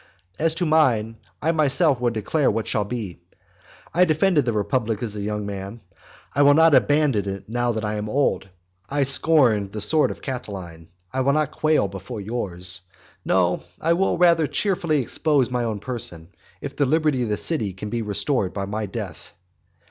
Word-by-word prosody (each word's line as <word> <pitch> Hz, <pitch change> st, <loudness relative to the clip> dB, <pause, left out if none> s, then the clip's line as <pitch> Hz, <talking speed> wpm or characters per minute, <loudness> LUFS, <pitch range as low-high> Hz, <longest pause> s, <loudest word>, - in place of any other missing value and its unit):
As 160 Hz, 0 st, +1 dB
to 175 Hz, -, -1 dB
mine, 125 Hz, -9 st, +2 dB, 0.3 s
I 160 Hz, -, +3 dB
myself 155 Hz, -2 st, +2 dB
will 120 Hz, -, +2 dB
declare 115 Hz, +6 st, 0 dB
what 110 Hz, +1 st, -1 dB
that -, -, -4 dB
shall 105 Hz, -, 0 dB
be. 100 Hz, -6 st, -6 dB, 0.7 s
I 180 Hz, -, +4 dB
defended 155 Hz, -2 st, +2 dB
the 120 Hz, -, +1 dB
republic 110 Hz, +1 st, -1 dB
as 105 Hz, -3 st, -4 dB
a 105 Hz, -, -4 dB
young 105 Hz, 0 st, -3 dB
man, 100 Hz, +3 st, -7 dB, 0.5 s
I 145 Hz, -, +2 dB
will 145 Hz, 0 st, +6 dB
not 160 Hz, 0 st, +5 dB
abandon 140 Hz, -10 st, +3 dB
it 95 Hz, 0 st, -6 dB
now 120 Hz, +2 st, 0 dB
that 110 Hz, -1 st, -3 dB
I 105 Hz, 0 st, -2 dB
am 105 Hz, 0 st, -4 dB
old. 105 Hz, -7 st, 0 dB, 0.4 s
I 145 Hz, 0 st, +1 dB
scorned 130 Hz, -7 st, +3 dB
the 110 Hz, -, -4 dB
sword 155 Hz, +8 st, +3 dB
of -, -, -8 dB
Catiline, 95 Hz, -, -6 dB, 0.3 s
I 130 Hz, -, 0 dB
will 140 Hz, +2 st, +2 dB
not 155 Hz, -1 st, 0 dB
quail 155 Hz, -9 st, +1 dB
before 95 Hz, +5 st, -8 dB
yours. 95 Hz, -5 st, -2 dB, 0.4 s
No, 90 Hz, -1 st, +1 dB, 0.2 s
I 165 Hz, +1 st, +2 dB
will 190 Hz, +3 st, +1 dB
rather 170 Hz, -3 st, +4 dB
cheerfully 170 Hz, -8 st, 0 dB
expose 140 Hz, -1 st, +1 dB
my 125 Hz, -1 st, -1 dB
own 110 Hz, -3 st, -3 dB
person, 95 Hz, -9 st, -3 dB, 0.3 s
if -, -, -6 dB
the 145 Hz, -, +1 dB
liberty 155 Hz, -2 st, +1 dB
of 120 Hz, -, -1 dB
the 105 Hz, -, 0 dB
city 110 Hz, -, -1 dB
can 105 Hz, +3 st, -7 dB
be 120 Hz, -1 st, -1 dB
restored 105 Hz, 0 st, -1 dB
by 100 Hz, -1 st, -3 dB
my 105 Hz, +1 st, -4 dB
death. 95 Hz, -, -8 dB
120 Hz, 185 wpm, -23 LUFS, 105-150 Hz, 0.7 s, will